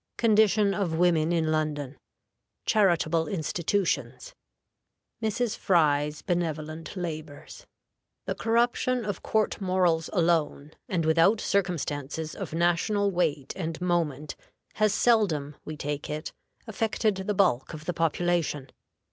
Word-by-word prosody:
Condition 215 Hz, -2 st, +4 dB
of 185 Hz, -5 st, -1 dB
Women 170 Hz, -2 st, +3 dB
in 160 Hz, -2 st, +1 dB
London. 150 Hz, -3 st, -2 dB, 0.7 s
Charitable 170 Hz, -6 st, +2 dB
Institutions. 180 Hz, -, -2 dB, 0.9 s
Mrs. 220 Hz, 0 st, -1 dB
Fry's 150 Hz, -4 st, +2 dB
benevolent 165 Hz, -1 st, -3 dB
Labors. 155 Hz, -4 st, -7 dB, 0.6 s
The -, -, -1 dB
corruption 240 Hz, +1 st, +1 dB
of 205 Hz, -4 st, -3 dB
court 215 Hz, -1 st, 0 dB
morals 180 Hz, -4 st, +1 dB
alone, 165 Hz, -5 st, +1 dB, 0.2 s
and 170 Hz, -4 st, 0 dB
without 165 Hz, +7 st, +4 dB
circumstances 160 Hz, -5 st, -2 dB
of -, -, -6 dB
national 175 Hz, +5 st, +1 dB
weight 150 Hz, -6 st, -1 dB
and 165 Hz, -4 st, -4 dB
moment, 165 Hz, -5 st, -1 dB, 0.4 s
has 215 Hz, -1 st, +2 dB
seldom, 190 Hz, -11 st, +2 dB
we 155 Hz, 0 st, -6 dB
take 145 Hz, 0 st, -4 dB
it, 155 Hz, +2 st, -5 dB, 0.3 s
affected 220 Hz, -1 st, 0 dB
the 190 Hz, +2 st, -2 dB
bulk 170 Hz, -6 st, +1 dB
of 155 Hz, 0 st, -10 dB
the 180 Hz, -, -1 dB
population. 165 Hz, -3 st, 0 dB
170 Hz, 115 wpm, -27 LUFS, 155-200 Hz, 0.9 s, Condition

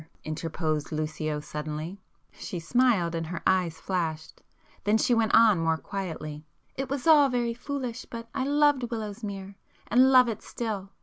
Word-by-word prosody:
interposed 155 Hz, -1 st, -2 dB
Lucio 155 Hz, -1 st, -2 dB
suddenly. 155 Hz, +5 st, -6 dB, 0.3 s
She 175 Hz, -, -6 dB
smiled 200 Hz, -2 st, +2 dB
and 165 Hz, -1 st, -3 dB
her 175 Hz, 0 st, -5 dB
eyes 175 Hz, -4 st, +1 dB
flashed,—then 180 Hz, +4 st, -3 dB
she 240 Hz, -, +2 dB
went 225 Hz, -2 st, +2 dB
on 225 Hz, -5 st, +6 dB
more 165 Hz, 0 st, +1 dB
quietly— 160 Hz, -6 st, -6 dB, 0.3 s
"It 270 Hz, 0 st, -4 dB
was 275 Hz, -2 st, -3 dB
all 300 Hz, -4 st, +7 dB
very 240 Hz, -2 st, 0 dB
foolish, 255 Hz, -1 st, -5 dB
but 230 Hz, -1 st, -8 dB
I 265 Hz, -, -1 dB
loved 290 Hz, 0 st, +3 dB
Willowsmere, 205 Hz, -3 st, -5 dB, 0.3 s
and 255 Hz, +4 st, +5 dB
love 255 Hz, -1 st, +7 dB
it 220 Hz, -2 st, -3 dB
still. 210 Hz, -5 st, -4 dB
200 Hz, 145 wpm, -27 LUFS, 160-245 Hz, 0.3 s, all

